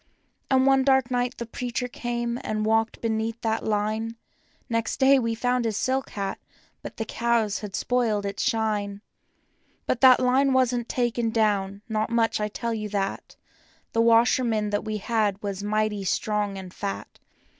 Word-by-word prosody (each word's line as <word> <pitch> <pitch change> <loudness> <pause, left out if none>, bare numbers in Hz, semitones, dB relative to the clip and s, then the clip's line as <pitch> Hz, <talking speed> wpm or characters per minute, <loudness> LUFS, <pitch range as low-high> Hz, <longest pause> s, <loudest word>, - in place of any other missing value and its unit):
And 260 -1 +4
one 270 -1 +4
dark 265 -2 +3
night 245 0 -1
the 235 - -4
preacher 245 +2 -3
came 240 0 -3
and 215 0 -2
walked 225 +1 +1
beneath 225 0 -1
that 225 -1 -1
line. 220 +2 -1 0.5
Next 230 -1 -1
day 270 0 +6
we 230 -2 -1
found 245 +1 0
his 220 -3 -1
silk 265 +1 0
hat, 195 -1 -4 0.4
but - - -9
the 225 - -2
cows 230 -3 0
had 205 -3 -6
spoiled 225 -5 0
its 200 - -3
shine; 210 -3 -1 0.8
But 245 - -1
that 260 -1 +8
line 265 +2 +3
wasn't 250 -2 +1
taken 240 -2 0
down, 205 -3 0
not 215 0 -1
much, 230 -2 +1
I 210 - 0
tell 230 +2 -3
you 215 -1 -4
that— 195 -1 -3 0.6
The 230 - +3
washerwoman 230 -2 +3
that 205 - 0
we 215 -1 -3
had 210 -2 0
was 200 -1 -3
mighty 210 -1 0
strong 205 +1 -1
and 185 -1 -9
fat. 200 -1 -6
225 Hz, 165 wpm, -25 LUFS, 210-240 Hz, 0.8 s, that